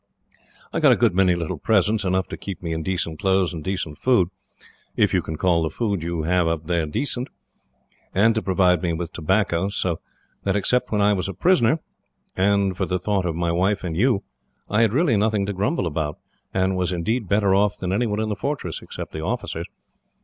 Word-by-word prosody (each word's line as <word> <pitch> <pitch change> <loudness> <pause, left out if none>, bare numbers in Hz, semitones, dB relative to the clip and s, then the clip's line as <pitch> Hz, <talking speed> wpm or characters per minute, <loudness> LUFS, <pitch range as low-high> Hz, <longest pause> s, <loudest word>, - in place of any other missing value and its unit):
I - - 0
got - - +6
a - - +6
good - - +2
many 90 -1 +3
little 85 -1 -3
presents, 105 +2 +2
enough 95 0 0
to - - -4
keep 95 -2 -7
me 85 -1 -2
in 80 - -2
decent 85 -3 -2
clothes 95 -3 +2
and 80 -2 -6
decent 90 -5 -3
food 120 -9 +3 0.7
if - - +2
you - - +3
can 80 - -5
call 85 -1 +2
the 80 - 0
food 100 +1 -2
you 85 -1 -2
have 90 +1 +2
up 80 -1 -1
there 85 -2 0
decent 125 - -1 0.8
and 110 +4 +4
to 110 - -1
provide 90 -3 +2
me 85 -2 0
with 85 +1 -4
tobacco; 95 +1 +1
so 90 -5 -1 0.4
that, 100 -1 0
except 125 +5 +1
that 105 -1 +1
I 105 +1 +4
was 95 -2 -1
a 100 - -5
prisoner, 165 -5 +3 0.5
and 100 0 +2
for - - -1
the 90 - 0
thought 95 0 -1
of 85 - -2
my 85 0 0
wife 95 +4 +1
and 85 -3 -3
you, 110 +2 +2 0.5
I 105 +2 +3
had 115 -3 +4
really 140 -3 +2
nothing 105 -1 +1
to 100 - -3
grumble 105 - 0
about, 75 -2 -2 0.3
and 95 0 +1
was 90 0 0
indeed 105 +5 -1
better 100 -1 +3
off 105 +1 +2
than 90 -2 -2
anyone 105 0 0
in 110 0 -1
the 105 - -1
fortress, 135 - -3
except - - -7
the 80 - -4
officers. 80 - -3
95 Hz, 210 wpm, -23 LUFS, 85-105 Hz, 0.8 s, got